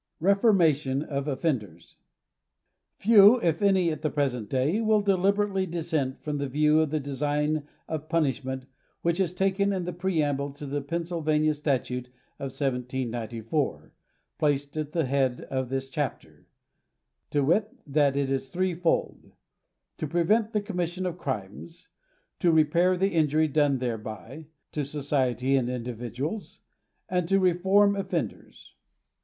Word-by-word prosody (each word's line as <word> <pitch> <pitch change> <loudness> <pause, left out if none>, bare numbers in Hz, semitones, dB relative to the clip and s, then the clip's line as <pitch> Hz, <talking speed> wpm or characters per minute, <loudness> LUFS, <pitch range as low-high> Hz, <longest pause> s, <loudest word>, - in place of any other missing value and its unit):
' - - -53
11 195 +5 +4
REFORMATION 155 - +3
OF 140 -1 -3
OFFENDERS* 130 - -3 1.0
Few, 215 +2 +7
if 165 0 +1
any, 190 -4 +3
at 155 -1 -5
the 155 - 0
present 125 -8 -1
day, 145 - +1
will 215 -1 +3
deliberately 195 0 +1
dissent 160 -5 -2
from 150 -1 -2
that 140 -1 -2
view 150 +3 +3
of 160 -1 +2
the 155 +1 0
design 145 +2 -1 0.2
of 155 -1 -5
punishment 130 -5 -1 0.4
which 170 +2 +1
is 180 -2 0
taken 195 +1 +1
in 185 -3 -2
the 180 - -4
preamble 150 -6 0
to 145 +1 -9
the 145 +1 -2
Pennsylvania 155 0 0
statute 130 -4 -2 0.3
of - - -4
1794, 125 -1 -3 0.5
placed 145 -1 0
at 155 -1 -3
the 165 - +1
bead 130 -2 0
of 130 -2 -1
this 135 0 -2
chapter, 145 0 -5 0.8
viz., 150 +9 +3 0.2
that 145 -1 +2
it 140 -1 0
is 135 0 -2
three 185 +4 0
fold; 170 0 -1 0.3
— - - -55
^to 155 - -3
prevent 210 +7 +2
the 210 - 0
commission 180 -3 -3
of 180 -1 -3
crimes, 130 - -6 0.5
to 175 -4 +3
repair 170 +4 +3
the 195 +2 +2
injury 155 -1 +3
done 145 -2 +2
thereby 115 - -5 0.2
to 150 - -2
society 135 -2 0
and 125 -2 +1
individuals, 125 - -5 0.5
and 180 -2 0
to 195 +2 +3
reform 190 +3 +4
offenders. 195 -1 -5
150 Hz, 140 wpm, -27 LUFS, 135-175 Hz, 1.0 s, Few